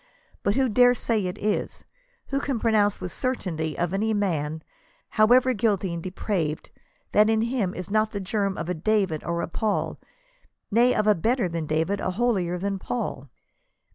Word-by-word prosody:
But 200 - +1
who 270 -1 +3
dare 245 +2 +5
say 220 -5 0
it 180 - -5
is? 210 0 -2 0.4
Who 275 - 0
can 275 -3 -2
pronounce 215 -3 +2
with 180 - -5
certainty 170 - -2
of 175 +1 -1
any 215 +2 +1
man, 160 -6 -1 0.5
however 245 +4 +4
guilty 200 -5 0
and 170 - -4
de 185 - -5
praved, 175 -5 -3 0.4
that 210 +1 +5
in 220 0 +2
him 230 -6 -1
is 185 +1 -6
not 215 +1 +2
the 200 - -4
germ 195 0 -1
of 165 - -4
a 180 - 0
David 185 -2 0
or 170 0 -2
a - - -2
Paul; 210 +5 -2 0.3
— - - -40
nay, 240 +4 +4
of 215 - +1
a 210 - +6
hetter 220 +1 0
than 165 -2 -3
David, 160 +6 0
a 185 - -1
holier 185 -4 0
than 195 +1 -2
Paul 185 - -4
200 Hz, 185 wpm, -25 LUFS, 175-225 Hz, 0.5 s, a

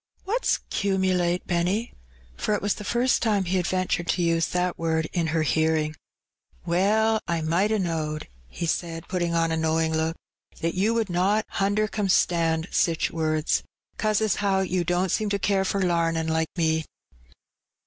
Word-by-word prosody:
''What's 455 +6 +1
'cumulate, 185 -3 +1
Benny?" 180 +6 0 0.4
for 210 - 0
it - - -3
was 205 - +2
the 210 - -8
first 240 +4 +1
iiime 205 -4 +1
he 185 +2 0
had 175 -1 0
ventured 185 -2 -1
to 175 - +1
use 165 -1 +2
that 180 0 -1
word 160 -1 0
in 170 -3 0
her 160 0 +1
hearing. 155 0 +1 0.7
"Well, 215 +5 +2
I 170 -1 0
might 170 +7 +1
a 220 - +2
knowed," 160 -5 -2 0.2
he 170 - -5
said, 165 0 -3
putting 175 -2 -1
on 165 -1 +2
a 160 - 0
know 160 0 +1
ing 160 0 0
look, 160 +1 0 0.5
"that 165 0 0
you 210 +5 +1
would 225 -5 0
not 200 +5 +2
hundercumstand 195 -5 +1
sich 165 -3 +1
words, 155 -1 0 0.4
'cause 215 0 +1
as 215 -4 +1
how 195 -2 +1
you 185 -1 0
don't 180 +2 0
seem 215 -1 0
to 200 - +1
care 195 -1 +1
for 195 0 0
lamin' 165 -2 +1
like 160 0 0
me." 160 -1 +1
175 Hz, 170 wpm, -25 LUFS, 165-200 Hz, 0.7 s, was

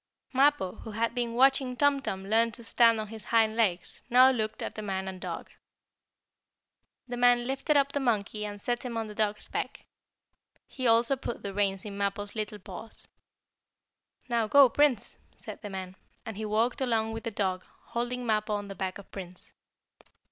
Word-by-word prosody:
Mappo, 270 -8 +3
who - - -9
had 225 +2 -1
been 235 -2 -2
watching 265 0 +3
Tum 285 -1 +3
Tum 190 -7 -4
learn 230 +2 +3
to 235 - -4
stand 230 -1 +4
on 215 -1 -4
his 220 -1 -5
hind 220 -1 +3
legs, 190 -6 0
now 255 +2 +7
looked 220 -4 -2
at - - -4
the 215 - -6
man 190 -2 -3
and 185 -1 -6
dog. - - -6 1.6
The 245 -1 -4
man 245 0 +4
lifted 270 +3 +1
up 280 0 +3
the 285 - -1
monkey 215 -4 0
and 205 -1 -5
set 240 +3 -2
him 240 -2 -4
on 225 - -1
the 210 - -8
dog's 210 0 -1
back. - - -4 0.8
He 255 -2 -3
also 235 +3 +4
put 250 -2 -6
the 200 - -4
reins 195 -1 0
in 200 -1 -6
Mappo's 200 0 -2
little 215 -1 -3
paws. 200 +3 -10 1.2
"Now 235 -3 +1
go, 275 +3 +7
Prince!" 290 -1 +1 0.2
said - - -9
the 205 - -6
man, 190 -1 -6 0.3
and 220 - -6
he 215 +2 -4
walked 225 +5 0
along 225 -3 +1
with 225 - -6
the 230 - -2
dog, 190 -4 -1 0.2
holding 245 +1 -3
Mappo 215 -1 +1
on 205 -1 -5
the - - -5
back 190 -1 -4
of 200 - -14
Prince. 185 -2 -9
225 Hz, 185 wpm, -29 LUFS, 205-245 Hz, 1.6 s, now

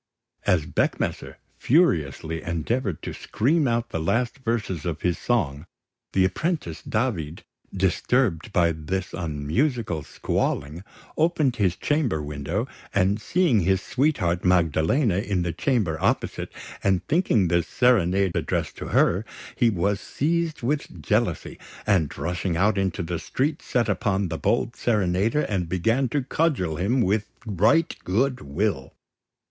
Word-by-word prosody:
As 80 -4 +3
Beckmesser - - -1 0.2
furiously 80 - +2
endeavoured 85 - -2
to - - -4
scream 145 +6 +1
out 115 0 -1
the 80 - -2
last 120 - 0
verses 110 - -2
of 85 -3 -3
his 90 -1 0
song, 75 - -1 0.5
the 95 -1 +4
apprentice 95 - -2
David, 100 - -2 0.3
disturbed 95 +1 +1
by 85 -3 +3
this 85 +4 -4
unmusical 85 - -1
squalling, 75 +3 -2 0.3
opened 155 -6 +2
his 95 -4 +2
chamber 145 - 0
window; 75 - -3 0.3
and, 100 +2 +2
seeing 165 - +2
his 95 +1 +2
sweetheart, 110 - 0
Magdalena, 90 - +2
in 100 -3 -1
the 85 -1 -2
chamber 105 - 0
opposite, - - -1 0.3
and 95 -2 +1
thinking 140 - +2
the 85 +1 +3
serenade 100 -4 +2
addressed - - -2
to - - -6
her, 95 +5 +3 0.3
he 120 -3 +3
was 100 0 0
seized 160 -1 -1
with 140 - -2
jealousy, - - 0 0.3
and, 90 -8 +1
rushing 85 0 -2
out 105 +5 +3
into 95 -1 -1
the 85 0 -3
street, 145 - -1
set 120 -2 0
upon 100 -4 0
the 80 - -4
bold 120 0 0
serenader 105 +4 +1
and 90 - -2
began 115 +9 +1
to 140 +2 0
cudgel 125 - 0
him 115 +9 +1
with 105 0 +1 0.2
right 110 - +2
good 125 +7 0
will. 70 -1 -2
100 Hz, 135 wpm, -25 LUFS, 85-125 Hz, 0.5 s, the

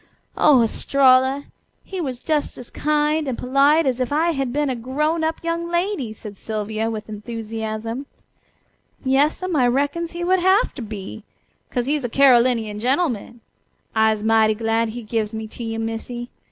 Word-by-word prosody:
Oh, 270 -6 +5
Estralla! 265 +3 +3 0.4
He 380 -2 -5
was 260 -6 -3
just 300 +3 -1
as 245 - -10
kind 300 0 +1
and 255 - -2
polite 280 +5 +3
as 260 -2 0
if 255 0 -1
I 320 +4 +2
had 270 -5 -2
been 295 +2 0
a 260 - -1
grown 300 +7 -1
up 320 +1 -2
young 335 0 -2
lady," 345 - -1
said 210 -2 -10
Sylvia 220 +1 -3
with 215 -1 -5
enthusiasm. 225 +3 -5 1.0
"Yas'm, 300 +7 +1
I 255 -4 +4
reckons 285 +7 0
he 345 0 -4
would 370 +1 +3
hafter 375 - +2
be, 215 -1 -7 0.5
'cos 245 -2 -1
he's 290 +1 0
a 245 - -2
Carolinian 240 -5 +4
gen'man. 245 - -1 0.5
I'se 220 -1 +2
mighty 220 -1 +4
glad 225 +1 0
he 240 +2 -7
gives 220 0 -2
me 220 0 -4
to 235 - -8
you, 225 0 -3
Missy. 225 +2 -5
250 Hz, 160 wpm, -22 LUFS, 225-300 Hz, 1.0 s, Oh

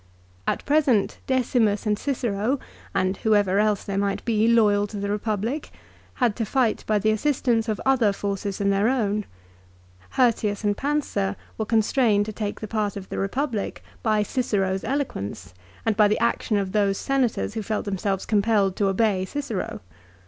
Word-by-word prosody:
At - - -1
present 280 -8 +2
Decimus 240 -5 +1
and 210 -1 +2
Cicero, 240 0 -1 0.3
and 185 +1 0
whoever 205 -3 +2
else 210 -1 +2
there 195 -1 -2
might 200 -1 -1
be 220 -1 +2
loyal 210 -3 +4
to 205 - -7
the 200 0 -2
Eepublic, 215 +6 -2 0.5
had 240 -5 +1
to 230 - 0
fight 235 0 +1
by 215 - +3
the 215 +2 +2
assistance 235 -1 +1
of 215 - -1
other 255 -6 +4
forces 200 0 -3
than 200 -1 +1
their 200 +3 +2
own. 210 -5 0 0.9
Hirtius 225 -4 +2
and 205 -1 +2
Pansa 270 -9 -1 0.2
were 220 - -3
constrained 220 -1 +3
to 215 - -6
take 205 -1 -4
the 215 - -4
part 210 -2 -1
of 190 -1 -8
the - - -4
Eepublic 220 +2 -2 0.2
by 215 -2 +2
Cicero's 195 -5 -1
eloquence, 100 - -3 0.3
and 225 -2 +2
by 210 -1 +5
the 210 - +1
action 230 -2 +1
of 195 -2 -1
those 200 -1 +2
Senators 265 -6 0
who 220 - -3
felt 215 0 -2
them 195 -2 -3
selves 195 -1 -1
compelled 205 -2 +2
to 200 - +2
obey 195 -1 +2
Cicero. 230 -1 -4
210 Hz, 170 wpm, -24 LUFS, 200-235 Hz, 0.9 s, by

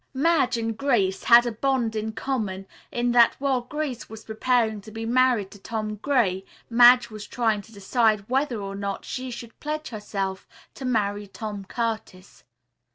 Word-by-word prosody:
Madge 295 -3 +2
and 225 -1 -2
Grace 210 -8 +1
had 240 0 +8
a 240 - -1
bond 235 -1 0
in 215 0 -2
common 215 -5 -3 0.3
in 240 0 0
that 240 -1 +5
while 270 -2 0
Grace 265 -1 -5
was 220 0 -10
preparing 220 -1 0
to 205 - -12
be 225 +1 -6
married 245 -4 +2
to 205 - -13
Tom 215 +1 -4
Gray, 210 -7 +1 0.3
Madge 245 0 +7
was 215 -1 -8
trying 225 -4 0
to 210 - -18
decide 215 0 +1
whether 260 -2 0
or 195 -1 -5
not 200 0 -4
she 260 0 -5
should 235 -1 -9
pledge 305 +1 -4
herself 195 -3 -4 0.3
to 265 - -8
marry 205 -4 0
Tom 205 0 -6
Curtis. 220 -4 -5
225 Hz, 165 wpm, -25 LUFS, 205-250 Hz, 0.3 s, had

